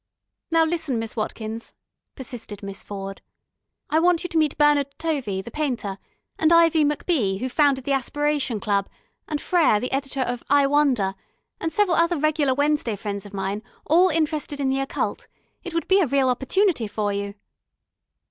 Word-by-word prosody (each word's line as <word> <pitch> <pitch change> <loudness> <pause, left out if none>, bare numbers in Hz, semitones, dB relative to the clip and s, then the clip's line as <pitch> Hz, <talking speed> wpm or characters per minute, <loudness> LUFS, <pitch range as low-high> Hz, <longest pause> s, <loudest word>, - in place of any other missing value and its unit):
"Now 330 -1 +4
listen, 315 -6 -1
Miss 225 -1 -4
Watkins," 220 +1 -4 0.4
persisted 230 -5 -8
Miss 195 0 -6
Ford. 195 -1 -7 0.7
"I 315 - +4
want 350 0 +3
you 355 - -4
to 330 - -1
meet 305 -2 +1
Bernard 295 -2 +4
Tovey, 265 -13 -2
the 235 - -9
painter, 240 -10 -2 0.4
and 320 +1 +3
Ivy 330 -2 +5
MacBee, 290 - +1
who 255 - -2
founded 275 -1 +2
the 280 - -2
Aspiration 275 -2 0
Club, 200 -1 0 0.4
and 300 -2 -2
Frere, 310 -11 +3
the 250 - -4
editor 270 0 -2
of 245 -1 -2
I 285 0 +5
Wonder, 275 -9 +2 0.5
and 325 - -2
several 400 -3 +2
other 335 0 +3
regular 295 -3 +1
Wednesday 285 -5 +1
friends 200 0 -5
of 205 - -15
mine, 195 +2 -2 0.2
all 355 +4 +5
interested 305 -3 -1
in 275 -1 +1
the 270 0 +1
Occult. 270 - -3 0.4
It 355 -2 -7
would 335 - -1
be 385 +1 +5
a 355 - +3
real 270 0 +2
opportunity 265 - +1
for 205 0 -2
you." 200 0 -4
275 Hz, 170 wpm, -24 LUFS, 220-315 Hz, 0.7 s, Ivy